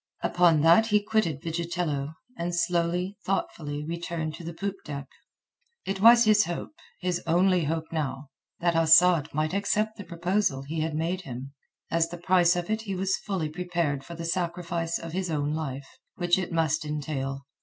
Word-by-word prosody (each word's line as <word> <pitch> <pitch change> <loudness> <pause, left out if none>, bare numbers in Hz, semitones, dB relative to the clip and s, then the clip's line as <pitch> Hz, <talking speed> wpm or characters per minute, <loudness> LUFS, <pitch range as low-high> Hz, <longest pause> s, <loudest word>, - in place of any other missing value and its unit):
Upon 170 -4 +4
that 170 +8 +6
he 210 -1 +4
quitted 205 -9 0
Vigitello, 165 -3 -2 0.2
and 175 -2 -3
slowly, 175 +2 0
thoughtfully, 150 -6 -3
returned 165 -1 -4
to 165 - -9
the 165 - -5
poop 195 +4 -4
deck. 140 -2 -6 0.8
It 195 0 -3
was 235 +2 +8
his 215 -1 +5
hope—his 180 - -5
only 180 0 +3
hope 160 +1 -3
now—that 150 +3 -3
Asad 165 -1 +5
might 155 +3 -1
accept 210 +2 0
the 205 - -7
proposal 175 -4 -1
he 155 +4 -4
had 160 -1 -2
made 170 +4 -1
him. 135 -3 -8 0.4
As 165 0 +2
the 175 - -7
price 175 0 +3
of 175 -1 -2
it 220 0 0
he 200 -3 -4
was 190 +1 0
fully 185 -7 -3
prepared 165 -4 -2
for 170 +4 -9
the 165 0 -6
sacrifice 170 -1 -2
of 165 - -7
his 185 0 -2
own 150 -1 -1
life, 140 -3 -5 0.2
which 175 +1 +2
it 180 - -4
must 160 -1 +1
entail. 140 -2 -4
170 Hz, 165 wpm, -27 LUFS, 155-180 Hz, 0.8 s, was